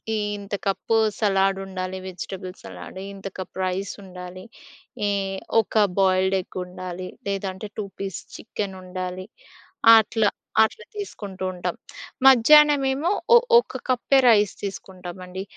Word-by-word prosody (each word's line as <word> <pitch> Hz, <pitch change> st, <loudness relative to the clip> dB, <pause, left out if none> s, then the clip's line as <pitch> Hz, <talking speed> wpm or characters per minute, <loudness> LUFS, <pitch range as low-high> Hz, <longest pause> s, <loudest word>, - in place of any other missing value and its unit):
ఇంత 205 Hz, -1 st, -4 dB
cup 210 Hz, +3 st, 0 dB, 0.2 s
salad 195 Hz, -2 st, +2 dB
ఉండాలి, 185 Hz, 0 st, -5 dB
vegetable 185 Hz, 0 st, -7 dB
salad, 95 Hz, -, -10 dB, 0.2 s
ఇంత 195 Hz, 0 st, -8 dB
కప్ 185 Hz, -, -7 dB
రైస్ 185 Hz, +1 st, -2 dB
ఉండాలి, 180 Hz, 0 st, -9 dB, 0.6 s
ఈ -, -, +1 dB, 0.5 s
ఒక 215 Hz, 0 st, +2 dB, 0.2 s
బాయిల్డ్ 190 Hz, 0 st, +3 dB
ఎగ్ 180 Hz, -, -12 dB
ఉండాలి. 185 Hz, 0 st, -7 dB, 0.2 s
లేదంటే 195 Hz, 0 st, -3 dB
2 210 Hz, -, -2 dB
పీస్ 195 Hz, -2 st, -4 dB, 0.2 s
చికెన్ 200 Hz, -3 st, -5 dB
ఉండాలి 185 Hz, 0 st, -5 dB, 0.7 s
అట్లా 220 Hz, -1 st, +2 dB, 0.3 s
అట్లా 450 Hz, -, -2 dB
తీసుకుంటూ 200 Hz, -, -7 dB
ఉంటాం. 180 Hz, -, -3 dB, 0.5 s
మధ్యాహ్నం 285 Hz, +3 st, +7 dB
ఏమో 310 Hz, +8 st, 0 dB, 0.2 s
ఒ -, -, +11 dB, 0.2 s
ఒక 480 Hz, -, 0 dB
కప్పే 255 Hz, +2 st, +3 dB
రైస్ 210 Hz, -2 st, +4 dB
తీసుకుంటామండి. 185 Hz, -1 st, -7 dB
195 Hz, 120 wpm, -24 LUFS, 185-210 Hz, 0.7 s, ఒ